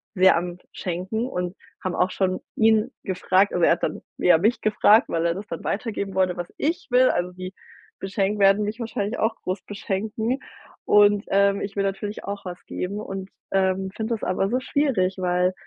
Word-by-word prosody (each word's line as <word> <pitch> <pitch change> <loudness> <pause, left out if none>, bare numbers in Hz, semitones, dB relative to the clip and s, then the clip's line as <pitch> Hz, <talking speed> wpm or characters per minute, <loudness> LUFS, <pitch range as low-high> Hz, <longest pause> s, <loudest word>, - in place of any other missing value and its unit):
sehr 185 -1 +6
am 175 0 -3
Schenken 185 +7 -3
und 180 -5 -3 0.3
haben 185 -1 -2
auch 185 +1 +1
schon 185 -1 -1
ihn 220 +3 +3
gefragt, 190 +1 +2
aber 175 -2 +3
er - - +5
hat 170 - -5
dann - - -2 0.2
eher 170 -3 +5
mich 220 +6 +2
gefragt, 215 +2 +4
weil 165 0 0
er 170 0 +1
das 205 +2 -7
dann 165 - -6
weitergeben 200 -2 -3
wollte, 185 -2 +1
was 175 0 -5
ich 335 +4 -1
will 255 +1 +5
Also 175 +1 0
sie 185 +1 -7 0.5
beschenk 195 +1 -1
werden 195 +1 +5
mich 215 +3 -4
wahrscheinlich 225 -1 -3
auch 220 +1 +1
groß 185 +1 -3
beschenken 215 +5 -2 0.5
und, 205 0 +5
ähm, 200 0 +3
ich 200 0 -5
will 200 - +1
natürlich 195 +2 -3
auch 200 -1 -6
was 180 -1 -6
geben 200 +3 -4
und, 195 -2 -6 0.2
ähm, 190 0 +1
finde 225 +1 -1
das 215 - -10
aber 195 +2 0
so 250 +2 +1
schwierig, 255 -10 0
weil 180 0 +1
195 Hz, 190 wpm, -24 LUFS, 185-215 Hz, 0.5 s, sehr